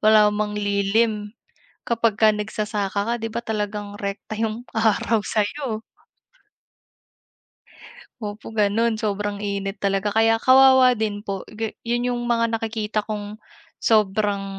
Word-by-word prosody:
wala 215 -1 +6
mang 210 0 -2
lilim 210 +1 0 0.5
kapagka 225 -2 +3
nagsasaka 210 -1 -2
ka, 235 - +1
'di 225 -1 -5
ba, 235 - -1
talagang 210 -2 -4
rekta 200 +2 -5
yung 225 +2 -3
araw 220 0 +2
sa'yo. 220 +1 -2 2.4
Opo, 210 0 -6
gano'n, 220 +1 +1
sobrang 205 -1 -2
init 200 0 -3
talaga. 195 +1 0
Kaya, 225 +2 +3
kawawa 260 -1 +6
din 210 -2 -2
po, 195 -2 -5
gi 220 0 -4
'yon 240 +1 0
yung 245 -1 -1
mga 230 -1 +1
nakikita 220 -1 -2
kong, 210 -1 -5 0.4
sobrang 205 -2 +1
215 Hz, 120 wpm, -23 LUFS, 205-225 Hz, 2.4 s, wala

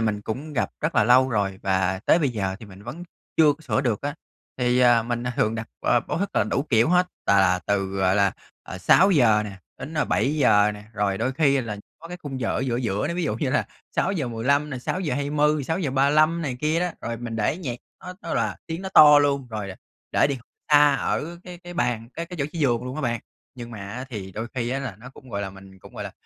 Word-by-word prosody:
mình 105 -2 0
cũng 140 +9 -5
gặp 130 - -1
rất - - -1
là - - +4
lâu 130 +3 +5
rồi, 100 -4 -1
và 95 -1 +1
tới - - +5
bây 150 -5 +1
giờ 95 -5 -2
thì 110 - -10
mình 95 0 -13
vẫn 125 +10 -7 0.3
chưa 155 -2 +6
có 145 - -14
sửa 150 - 0
được 120 -6 -1
á. 145 0 -3 0.4
Thì, 125 0 +2
à, 120 -2 +5
mình, 120 +1 -3
à, 125 - -1
thường 110 +1 +1
đặt 110 0 -4 0.2
b - - -23 0.2
báo - - -2
thức 200 +2 -1
là - - +4
đủ 120 +5 0
kiểu 115 +1 +4
hết, 180 +1 +4 0.2
tà 100 0 +4
là 90 -1 +3
từ, 100 -1 +1
gọi 95 0 +1
là, 100 -2 +3 0.3
ờ, 90 - -8
6:00 120 - +5
nè, 105 - -6 0.3
đến 155 +4 -7
7:00 125 -8 +3
nè, 105 0 -11
rồi 100 -2 -1
đôi 120 +4 0
khi 140 -1 +3
là 110 -4 -5 0.2
có 165 - -11
cái 180 - -6
khung 135 -3 -5
giờ 115 - -1
ở - - 0
giữa 130 -3 -1
giữa 110 -1 -1
nữa 170 - -2
ví 180 - -1
dụ 110 - -1
như 130 +1 -1
là - - +1 0.3
6:15 140 - 0
này, 130 -3 -5
6:20, 150 -1 0
6:35 155 +1 +2
này 130 -5 -3
kia 155 +2 +1
đó. 180 0 0
Rồi 115 0 -4
mình 115 -1 -5
để 110 +8 0
nhạc 130 -10 -4 0.2
nó 180 - -8
nó - - -3
là - - 0
tiếng 165 +2 -5
nó 190 - -4
to 150 -5 +8
luôn 140 -2 +1
rồi 105 -3 -4
là 95 - -8 0.4
để - - +4
đi 140 -2 -2 0.3
xa 145 -1 +7
ở 170 +5 -2
cái 180 -1 -9
cái 175 0 -10
bàn, 120 -9 -1
cái 165 - -4
cái 180 +1 -8
chỗ 140 - 0
chí 170 - -6
giường 125 -5 +1
luôn 125 +2 -5
á 155 - -3
bạn, 120 -2 -1 0.3
nhưng 120 -2 -8
mà 110 - -8
á, 100 +6 -6
thì 95 -5 -6
đôi 110 +5 -4
khi 120 -2 -1
á, 135 - -1
là 130 -8 -5
nó 125 +3 -11
cũng 130 -1 -15
gọi 100 -2 -3
là, 95 - -4
mình 95 0 -14
cũng, - - -15
gọi - - -5
là, - - -7
125 Hz, 250 wpm, -24 LUFS, 105-150 Hz, 0.4 s, to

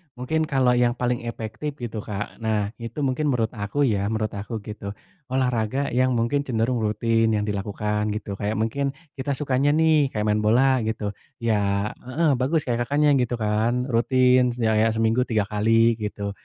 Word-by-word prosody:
Mungkin 160 +6 -1
kalau 130 -3 +2
yang 120 0 +2
paling 125 -1 -1
efektif, 115 +6 -5
gitu, 120 -5 -5
Kak, 100 -2 -5
nah, 110 -2 0
itu 115 +4 -6
mungkin 135 +3 0
menurut 115 -3 0
aku 105 +7 -3
ya, 105 -6 +1
menurut 110 -1 -1
aku 105 +3 -5
gitu, 105 -2 -6 0.4
olahraga 130 +1 0
yang 130 +1 +2
mungkin 120 +5 +1
cenderung 120 0 0
rutin 115 +1 +1
yang 105 - 0
dilakukan 105 +1 -2
gitu, 105 -2 -5
kayak 105 +1 -1
mungkin 135 +5 -1 0.3
kita 135 +1 -2
sukanya 140 0 +1
nih, 155 -4 +3
kayak 105 0 -2
main 105 0 +2
bola, 130 +4 +4
gitu. 105 -2 -2 0.3
Ya 100 -2 +1 0.2
heeh, 155 +4 +2
bagus 150 +5 +1
kayak, 120 -1 0
Kakaknya, 145 +1 +3
gitu, 125 -1 0
kan, 115 +4 0
rutin, 125 +1 +3
ya 110 -3 +1
ya 110 +1 +4
seminggu 115 +2 +2
3 110 -4 +1
kali, 115 +2 +3
gitu. 105 -1 -4
115 Hz, 170 wpm, -24 LUFS, 105-130 Hz, 0.4 s, bola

